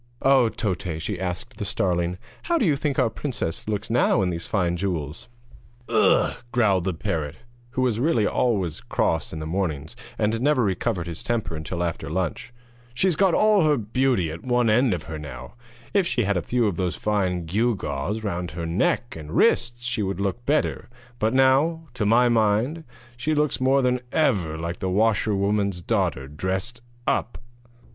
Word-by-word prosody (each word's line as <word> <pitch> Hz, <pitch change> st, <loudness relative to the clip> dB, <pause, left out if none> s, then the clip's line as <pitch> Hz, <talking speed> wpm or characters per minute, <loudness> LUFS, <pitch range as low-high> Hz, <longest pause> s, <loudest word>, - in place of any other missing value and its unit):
'Oh, 135 Hz, -4 st, +5 dB
Toté,' 90 Hz, -3 st, -3 dB
asked 95 Hz, +7 st, -5 dB
the -, -, -4 dB
starling, 90 Hz, -3 st, 0 dB, 0.2 s
'how 340 Hz, 0 st, +1 dB
do 245 Hz, -, +2 dB
you 155 Hz, -5 st, +3 dB
think 140 Hz, -1 st, -2 dB
our 115 Hz, -, +2 dB
princess 120 Hz, -, -4 dB
looks 110 Hz, +1 st, -2 dB
now 120 Hz, -3 st, +3 dB
in 90 Hz, -, 0 dB
these 85 Hz, 0 st, -5 dB
fine 90 Hz, -4 st, 0 dB
jewels?' 85 Hz, -1 st, -4 dB, 0.6 s
'Ugh!' -, -, +3 dB, 0.2 s
growled 100 Hz, -7 st, +2 dB
the 95 Hz, -, 0 dB
parrot, 80 Hz, -2 st, -3 dB, 0.4 s
who 130 Hz, -, 0 dB
was 120 Hz, -3 st, +1 dB
really 120 Hz, -6 st, +2 dB
always 100 Hz, -10 st, 0 dB
cross -, -, -1 dB
in 80 Hz, -, -6 dB
the 80 Hz, -, -5 dB
mornings, 80 Hz, -4 st, -3 dB, 0.2 s
and 110 Hz, +2 st, 0 dB
never 145 Hz, -2 st, +3 dB
recovered 95 Hz, -2 st, -1 dB
his 85 Hz, -2 st, -6 dB
temper 110 Hz, -9 st, -2 dB
until 85 Hz, +3 st, -3 dB
after 85 Hz, -4 st, -3 dB
lunch, 90 Hz, +6 st, -3 dB, 0.4 s
'she's 180 Hz, +6 st, +3 dB
got 190 Hz, -1 st, +3 dB
all 210 Hz, -2 st, +4 dB
her 150 Hz, -2 st, +3 dB
beauty 115 Hz, -5 st, +1 dB
at 80 Hz, +2 st, -7 dB
one 120 Hz, -3 st, +2 dB
end 120 Hz, -2 st, +3 dB
of 80 Hz, -, -6 dB
her 80 Hz, -1 st, -6 dB
now; 70 Hz, -4 st, -9 dB, 0.4 s
if 195 Hz, -3 st, +3 dB
she 120 Hz, -, +1 dB
had 100 Hz, 0 st, +1 dB
a 90 Hz, -, +1 dB
few 120 Hz, +6 st, 0 dB
of 100 Hz, -5 st, 0 dB
those 90 Hz, -2 st, -1 dB
fine 95 Hz, -5 st, 0 dB
gew 110 Hz, +8 st, +1 dB
gaws 95 Hz, +7 st, -3 dB
round 90 Hz, -4 st, -2 dB
her 85 Hz, +2 st, -5 dB
neck 100 Hz, +7 st, 0 dB
and 75 Hz, -2 st, -8 dB
wrists 120 Hz, +1 st, +2 dB
she 120 Hz, -2 st, -1 dB
would 95 Hz, -2 st, -2 dB
look 100 Hz, +4 st, -2 dB
better; 150 Hz, -4 st, 0 dB, 0.3 s
but 110 Hz, +1 st, +2 dB
now, 135 Hz, +6 st, +3 dB
to 110 Hz, -4 st, -1 dB
my 120 Hz, +3 st, +5 dB
mind, 115 Hz, +7 st, +2 dB, 0.3 s
she 150 Hz, +6 st, -1 dB
looks 150 Hz, -3 st, +1 dB
more 135 Hz, +1 st, +3 dB
than 125 Hz, 0 st, +2 dB
ever 100 Hz, -, +1 dB
like 85 Hz, +2 st, -4 dB
the 95 Hz, -, -2 dB
washerwoman's 100 Hz, -1 st, +1 dB
daughter 85 Hz, -8 st, -1 dB
dressed 95 Hz, -, -2 dB, 0.2 s
up.' 120 Hz, -, 0 dB
105 Hz, 180 wpm, -24 LUFS, 85-125 Hz, 0.6 s, Oh